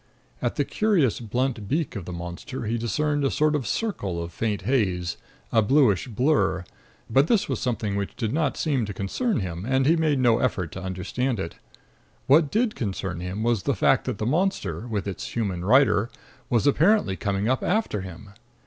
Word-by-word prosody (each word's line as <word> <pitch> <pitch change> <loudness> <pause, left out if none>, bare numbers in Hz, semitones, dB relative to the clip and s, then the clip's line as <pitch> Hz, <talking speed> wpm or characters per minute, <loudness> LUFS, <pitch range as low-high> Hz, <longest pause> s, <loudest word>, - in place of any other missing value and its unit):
At - - -1
the - - +1
curious 190 - +1
blunt 120 -1 -2
beak 155 +2 -1
of 95 -5 -5
the 90 - -6
monster 85 +10 -6
he 115 +2 -1
discerned 145 +6 0
a 135 - +3
sort 155 +2 +2
of 135 -7 -2
circle 100 - -2
of 85 0 -5
faint 105 -2 -2
haze, 95 -8 0 0.4
a 115 - +4
bluish 115 -4 +3
blur, 120 - +1 0.4
but 135 +3 +3
this 220 0 +2
was 130 -5 -2
something 110 -5 -1
which 100 -1 -3
did 110 -1 -2
not 150 -3 0
seem 140 -6 0
to 100 - -6
concern 160 - -1
him, 90 -1 -4
and 130 +3 +1
he 160 +4 +5
made 155 -3 +2
no 120 -3 +3
effort 95 -9 -1
to 95 - -7
understand 95 +6 -2
it. 85 -3 -5 0.7
What 150 +2 +5
did 220 - +1
concern 95 -5 -3
him 90 +5 -4
was 120 -3 +1
the - - 0
fact - - +3
that - - -2
the 105 - -3
monster, 165 - -1
with 105 -4 -3
its 100 - -5
human 95 -7 -1
rider, 120 0 +4 0.4
was 115 -3 +2
apparently 150 - +3
coming 100 +2 -1
up 130 +1 +1
after 195 - 0
him. 95 +1 -9
115 Hz, 190 wpm, -25 LUFS, 95-140 Hz, 0.7 s, he